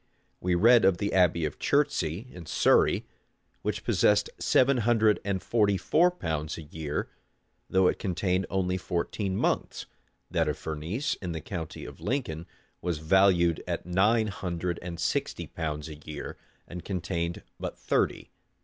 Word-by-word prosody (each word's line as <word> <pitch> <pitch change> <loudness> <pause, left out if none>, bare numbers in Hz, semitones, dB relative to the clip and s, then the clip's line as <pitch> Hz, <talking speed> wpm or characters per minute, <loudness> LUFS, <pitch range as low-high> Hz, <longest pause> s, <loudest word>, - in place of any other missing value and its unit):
We 90 -1 +1
read 115 +6 +6
of 95 -2 +4
the 100 +2 -2
abbey 85 -3 +3
of 75 - -5
Chertsey, 105 - +1
in 85 -3 -10
Surrey, - - +3 0.6
which - - -2
possessed 105 0 +3
seven 130 +1 +4
hundred 110 -2 +3
and 100 -2 -2
forty 105 -4 +2
four 170 - +3
pounds 80 - -3
a 80 - -7
year, 75 -1 -4 0.6
though 95 0 +3
it - - 0
contained 95 -1 0
only 95 -1 0
fourteen 95 +2 -2
monks: - - -1 0.5
that 85 -3 +1
of 75 - -2
Furnese, 80 - -3
in 90 -3 -3
the 80 - -3
county 80 -1 -6
of - - -11
Lincoln, 115 - -2 0.3
was 85 -2 -1
valued 85 +1 +3
at - - -3
nine 105 +6 +3
hundred 90 -3 -3
and 85 -1 -6
sixty 85 - -1
pounds 75 -2 -4
a 80 - -7
year, 75 0 -7 0.3
and 90 -1 -7
contained 85 -2 -3 0.2
but - - -5
thirty. - - -1
90 Hz, 150 wpm, -28 LUFS, 85-100 Hz, 0.6 s, read